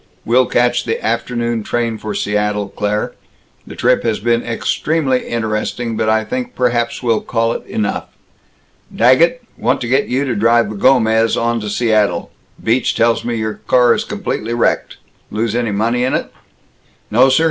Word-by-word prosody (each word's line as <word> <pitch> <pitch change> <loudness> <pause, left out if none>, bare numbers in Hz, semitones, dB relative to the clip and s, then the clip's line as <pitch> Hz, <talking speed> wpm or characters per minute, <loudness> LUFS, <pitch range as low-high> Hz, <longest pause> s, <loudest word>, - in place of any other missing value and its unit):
We'll 125 +2 +3
catch 120 0 +2
the 115 - -3
afternoon 120 0 -1
train 115 0 -2
for 105 -1 -5
Seattle, 105 -1 -1
Claire. 105 +1 -2 0.5
The - - -9
trip 125 +1 +2
has 115 -2 -1
been 115 +2 +1
extremely 130 +3 -1
interesting, 115 +1 -2
but 110 0 0
I 110 0 +2
think 250 -1 -4
perhaps 120 -1 0
we'll 115 -3 +1
call 115 0 0
it - - -6
enough. 105 -2 -2 0.9
Daggett, 165 - +4 0.2
want 125 +4 +1
to 120 - -3
get 135 +4 +2
you 130 +3 0
to 125 -4 -1
drive 115 +2 +3
the - - -6
Gomez 110 -1 +3
on 120 0 0
to 105 -1 -5
Seattle. 110 -1 +1 0.3
Beach 115 +2 +1
tells 115 0 +2
me 120 -1 -2
your 110 -1 -2
car 125 -2 +5
is 215 - -1
completely 205 - -3
wrecked. 120 - 0 0.3
Lose 110 0 -2
any 120 -3 0
money 115 +4 0
in 130 - +1
it?" - - -3 0.8
"No, 125 +5 +5
sir. 135 - +3
115 Hz, 170 wpm, -17 LUFS, 110-125 Hz, 0.9 s, car